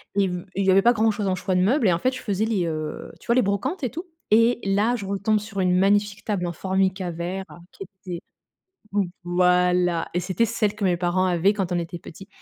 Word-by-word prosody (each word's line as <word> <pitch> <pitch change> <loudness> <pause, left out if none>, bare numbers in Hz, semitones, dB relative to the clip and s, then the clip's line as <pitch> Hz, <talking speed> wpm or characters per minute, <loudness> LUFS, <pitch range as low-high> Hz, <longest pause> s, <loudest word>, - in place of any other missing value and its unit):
et 200 -1 +3
v 180 -1 -4
et 195 - 0
il 195 - 0
y - - +6
avait 195 +1 +5
pas 240 +1 +5
grand-chose 220 -2 +1
en 185 - +1
choix 185 +1 -2
de 180 - +3
meubles, 225 +4 +3
et 180 - +4
en 170 - -1
fait, 255 - +1
je - - -6
faisais 205 0 -1
les, 205 -6 0
heu, 155 -1 -5
tu - - -18
vois? 235 - +3
Les 255 - +5
brocantes 255 - -2
et 250 - -1
tout, 340 +3 -6 0.3
et 230 +2 +4
là, 205 +5 +2
je 205 - -6
retombe 200 +2 0
sur 205 -1 -7
une 180 -1 +2
magnifique 200 +1 +1
table 195 -5 -1
en 170 - -2
Formica 190 0 -1
vert 180 +3 -4 0.3
qui - - -9
était 185 -2 -8 0.7
v 205 - +2 0.2
voilà 180 -1 +2
et 180 - +1
c'était 185 +5 0
celle 210 -2 0
que 205 - -3
mes 180 -2 +2
parents 180 +1 +1
avaient 180 +2 +3
quand 190 -3 -2
on 175 - +1
était 170 +1 -5
petit 190 +4 -12
195 Hz, 245 wpm, -24 LUFS, 180-210 Hz, 0.7 s, y